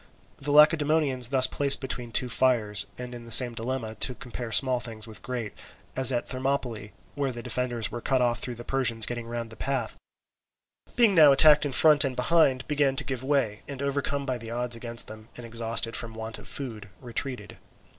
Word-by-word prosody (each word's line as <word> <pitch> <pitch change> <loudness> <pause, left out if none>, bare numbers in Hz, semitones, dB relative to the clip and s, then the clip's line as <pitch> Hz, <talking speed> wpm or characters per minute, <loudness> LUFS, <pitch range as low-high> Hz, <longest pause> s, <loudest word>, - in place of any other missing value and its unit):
The 140 - -5
Lacedaemonians 150 -3 +4
thus 130 0 +3
placed 140 +1 +1
between 125 -3 -5
two 125 - +1
fires, 115 -5 +2
and 125 0 -7
in 120 -1 -9
the 115 - -12
same 120 +1 +5
dilemma, 115 -1 -4
to 125 - +2
compare 120 -2 -7
small 130 0 +4
things 110 -3 -8
with 110 -2 -9
great, 120 -4 -5 0.4
as 130 0 +5
at 120 -2 -2
Thermopylae, 130 -5 -3 0.2
where 140 -2 -2
the 120 -1 -8
defenders 120 -4 -2
were 120 - -6
cut 130 +1 +1
off 120 -2 0
through 125 0 -4
the 120 - -9
Persians 120 -4 +2
getting 120 -1 -5
round 115 -1 -5
by - - -10
the - - -15
path, 130 -5 -2 1.0
being 230 -4 +4
now 155 -5 +7
attacked 150 +1 +6
in - - -6
front 150 +2 +5
and 135 -2 -2
behind, 130 0 +2
began 145 -3 +1
to 145 - 0
give 130 -4 -4
way, 130 -7 0
and 140 -2 -7
overcome 140 0 -2
by 130 -2 -3
the 115 -1 -9
odds 120 0 -2
against 115 0 -4
them 110 0 -12
and 120 - -9
exhausted 115 0 -2
from 115 -1 -2
want 110 0 -6
of - - -13
food, 110 -7 -7
retreated. 125 +1 -5
125 Hz, 200 wpm, -26 LUFS, 115-135 Hz, 1.0 s, now